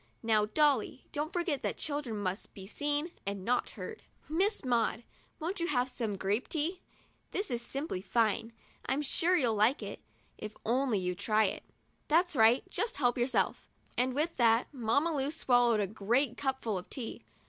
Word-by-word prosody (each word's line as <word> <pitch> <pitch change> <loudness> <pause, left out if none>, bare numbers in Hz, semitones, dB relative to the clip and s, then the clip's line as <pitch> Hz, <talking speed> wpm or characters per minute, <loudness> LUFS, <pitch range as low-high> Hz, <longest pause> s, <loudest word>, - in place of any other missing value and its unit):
Now, 215 -2 +3
Dolly, 270 0 +2
don't 300 +2 -2
forget 345 -6 -1
that - - -2
children 285 -7 -3
must 195 0 -3
be 195 -2 -8
seen 290 - -1
and 200 -1 -4
not 245 +1 +1
heard. 445 - -6 0.3
Miss 375 +3 0
Maud, 240 -1 +1 0.4
won't 350 +5 -3
you 340 - 0
have 250 -5 +1
some 225 -5 -2
grape 200 +5 0
tea? 335 +4 -1 0.5
This 400 - -2
is 240 -1 -1
simply 275 - -4
fine. 225 +3 +1 0.4
I'm 270 +4 +1
sure 345 +5 +2
you'll 245 -8 +2
like 215 +7 +3
it, - - -7 0.4
if 215 0 -6
you'll 230 - +2
only 215 -9 +1
try 215 +4 +2
it. 195 - -1 0.5
That's 340 +2 +3
right, 230 +1 +5
just 475 +2 -1
help 245 -3 +2
yourself;" 245 +1 0 0.3
and 255 +1 +1
with 320 +4 0
that, 230 +2 +3
Mamma 280 +6 +1
Lu 270 -1 +1
swal 245 -5 +3
lowed 225 -2 +3
a 205 - +2
great 225 +7 +1
big 240 - -16
cupful 260 -7 -1
of 180 - -13
tea. 240 -4 -5
250 Hz, 180 wpm, -32 LUFS, 220-295 Hz, 0.5 s, right